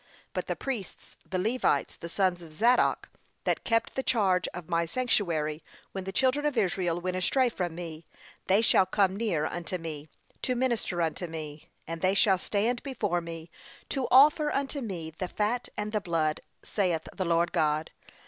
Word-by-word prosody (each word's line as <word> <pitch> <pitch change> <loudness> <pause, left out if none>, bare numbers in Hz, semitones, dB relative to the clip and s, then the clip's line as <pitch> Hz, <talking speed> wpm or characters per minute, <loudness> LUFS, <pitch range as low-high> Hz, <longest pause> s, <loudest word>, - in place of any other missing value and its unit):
'But - - -3
the - - -1
priests, 240 -9 -5
the 185 - -1
Levites, 225 +7 +1
the 170 - -8
sons 185 -1 +1
of 165 -2 -11
Zadok, 235 +10 +3 0.3
that - - 0
kept 230 -1 +1
the 265 - -1
charge 195 -8 +2
of 180 -3 -7
my 170 -1 +1
sanctuary 165 -9 0 0.3
when 190 -1 -5
the 190 - -3
children 260 +7 +2
of 295 -4 0
Israel 180 -4 +1
went 185 +1 -2
astray 250 +8 +3
from 180 -7 -3
me, 165 -2 -7 0.4
they 200 +4 +4
shall 190 -4 +5
come 190 0 +2
near 200 -8 0
unto 175 +2 -3
me, 155 -3 -7 0.3
to 255 - 0
minister 235 -8 0
unto 165 +2 -2
me; 155 -2 -7 0.2
and 165 0 -5
they 190 +1 +3
shall 195 -2 +4
stand 225 +6 0
before 210 -10 -1
me, 165 -1 -8 0.4
to 265 -3 -1
offer 295 +3 +6
unto 280 +1 -2
me 175 -8 -5
the 185 - -1
fat 215 +6 -1
and 210 0 -2
the 210 -1 0
blood, 160 -4 0 0.2
saith 180 -6 0
the 185 - -1
Lord 170 0 +2
God. 155 -2 +1
185 Hz, 175 wpm, -29 LUFS, 165-230 Hz, 0.4 s, offer